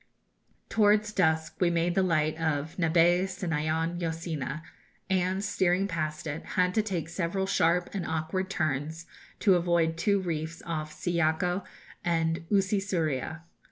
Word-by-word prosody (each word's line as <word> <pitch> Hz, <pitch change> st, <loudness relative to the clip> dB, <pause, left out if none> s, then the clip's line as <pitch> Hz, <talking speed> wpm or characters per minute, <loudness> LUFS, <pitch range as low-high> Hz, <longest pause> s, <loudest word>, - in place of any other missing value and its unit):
Towards 210 Hz, -1 st, +3 dB
dusk 160 Hz, -4 st, +1 dB
we 180 Hz, -, +3 dB
made 170 Hz, +1 st, +1 dB
the 190 Hz, -, +3 dB
light 155 Hz, -4 st, +2 dB
of 155 Hz, -1 st, -1 dB
Nabae 175 Hz, +2 st, +4 dB
Sinaon 165 Hz, -2 st, -1 dB
Yo 165 Hz, -, 0 dB
Sina, 160 Hz, -2 st, -4 dB, 0.5 s
and, 190 Hz, +2 st, +1 dB
steering 190 Hz, -1 st, +2 dB
past 155 Hz, -4 st, -3 dB
it, 155 Hz, +1 st, -4 dB
had 180 Hz, 0 st, +3 dB
to 215 Hz, -, +3 dB
take 185 Hz, -7 st, -3 dB
several 175 Hz, +3 st, -1 dB
sharp 180 Hz, -2 st, +2 dB
and 190 Hz, -4 st, -3 dB
awkward 160 Hz, +4 st, -2 dB
turns, 155 Hz, -1 st, -2 dB, 0.4 s
to 200 Hz, -, +5 dB
avoid 170 Hz, -2 st, +2 dB
two 200 Hz, +3 st, +2 dB
reefs 165 Hz, -2 st, -4 dB
off 155 Hz, -2 st, -3 dB
Siyako 175 Hz, +2 st, 0 dB, 0.4 s
and 165 Hz, -1 st, 0 dB
Usi 200 Hz, 0 st, +2 dB
Suria. 160 Hz, -5 st, -2 dB
170 Hz, 140 wpm, -28 LUFS, 160-185 Hz, 0.5 s, to